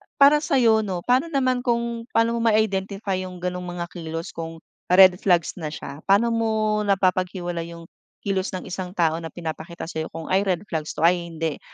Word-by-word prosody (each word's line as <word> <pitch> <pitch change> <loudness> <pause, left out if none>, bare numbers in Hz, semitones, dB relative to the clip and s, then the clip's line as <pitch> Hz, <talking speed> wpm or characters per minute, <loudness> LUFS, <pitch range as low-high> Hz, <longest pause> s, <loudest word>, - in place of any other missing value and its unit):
para 290 +1 +6
sayo, 245 -7 +3
'no? 185 -5 -3
Paano 255 +6 +2
naman 255 -4 +1
kung 235 -1 -1
pano 230 +1 +4
mo 230 - +1
ma-identify 200 -2 0
yung 180 -1 -10
ganung 180 0 -3
mga 175 -1 -5
kilos 165 -1 -6
kung 165 0 -7 0.2
red 185 0 +7
flags 175 -1 +1
na 155 - -3
siya? 150 -1 -7
Paano 220 +4 +4
mo 220 -2 +1
napapaghiwalay 180 -3 0
yung 165 0 -13 0.3
kilos 190 -1 -1
ng 185 - -5
isang 185 0 -6
tao 165 -1 +2
na 165 - -6
pinapakita 165 0 -7
sa'yo 160 -1 -4
kung, 165 +2 -8
"Ay 195 +1 +2
red 185 +1 0
flags 155 -1 -3
to, 160 - -3
ay 170 0 +3
hindi. 165 -2 -3
185 Hz, 185 wpm, -23 LUFS, 170-220 Hz, 0.3 s, red